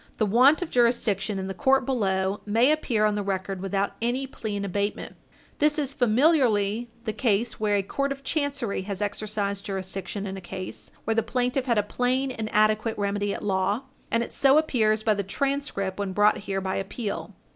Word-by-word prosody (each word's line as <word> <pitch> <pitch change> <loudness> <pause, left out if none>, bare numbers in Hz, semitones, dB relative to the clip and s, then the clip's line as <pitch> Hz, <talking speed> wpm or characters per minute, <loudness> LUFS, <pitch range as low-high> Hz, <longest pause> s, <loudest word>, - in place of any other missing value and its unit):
The 215 - +2
want 255 - +5
of 340 - -8
jurisdiction 220 -4 +1
in 190 - -3
the 195 - -3
court 265 +6 +3
below 195 -6 0
may 230 +7 +3
appear 240 -8 +1
on 210 - +2
the 205 - -1
record 195 -1 -3
without 195 +1 -1
any 245 +3 0
plea 220 -5 -5
in 200 0 -2
abatement. 200 +2 -3 0.4
This 300 +1 +3
is 280 -3 0
familiarly 240 -4 +2 0.2
the 215 - -1
case 225 -1 0
where 210 -1 +2
a 200 - +1
court 275 +8 -2
of 275 0 -5
chancery 280 -9 -1
has 195 0 -5
exercised 205 -1 -2
jurisdiction 195 +1 -4
in 195 -1 -5
a - - -7
case 185 +1 -7
where 225 - 0
the 225 - +2
plaintiff 250 +2 -1
had 235 -2 +2
a 210 - +3
plain 255 +5 0
and 220 -3 -4
adequate 215 +1 +2
remedy 205 0 -1
at - - -5
law, 200 +4 0 0.3
and 230 0 +1
it - - -8
so 275 +1 +5
appears 220 -8 +2
by 215 - +3
the 200 - -1
transcript 200 -3 -2
when 200 -2 -2
brought 205 +2 +4
here 195 0 0
by 190 0 -2
appeal. 200 +2 -4
215 Hz, 195 wpm, -26 LUFS, 200-250 Hz, 0.4 s, want